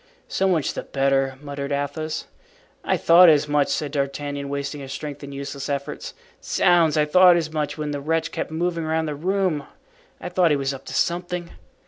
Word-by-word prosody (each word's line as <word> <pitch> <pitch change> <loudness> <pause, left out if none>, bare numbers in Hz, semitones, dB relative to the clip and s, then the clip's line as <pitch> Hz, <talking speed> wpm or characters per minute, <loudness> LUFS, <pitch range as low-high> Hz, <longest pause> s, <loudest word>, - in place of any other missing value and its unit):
"So 195 - 0
much 170 -6 +1
the - - -4
better," 135 -1 0
muttered 140 -1 -5
Athos. 145 +2 -3 0.6
"I - - +1
thought 170 +1 +7
as 150 -1 +4
much," 145 -1 +2
said 150 -3 -2
D'Artagnan, 140 0 -3
wasting 140 +1 -4
his 135 -1 -8
strength 145 +1 -6
in 140 - -7
useless 140 0 -6
efforts. 140 +1 -4 0.3
"Zounds, 170 -4 +3
I 150 - +4
thought 180 +3 +6
as 160 -2 -2
much 155 -1 -2
when 150 -1 -3
the 145 -1 -4
wretch 160 +3 -1
kept - - -4
moving 170 +1 -2
around 160 0 0
the 150 - -3
room. 180 -1 -1 0.5
I - - -6
thought 180 -1 +3
he 150 - +3
was 135 0 -1
up 135 0 -10
to - - -7
something." 175 0 -1
150 Hz, 190 wpm, -23 LUFS, 140-165 Hz, 0.6 s, thought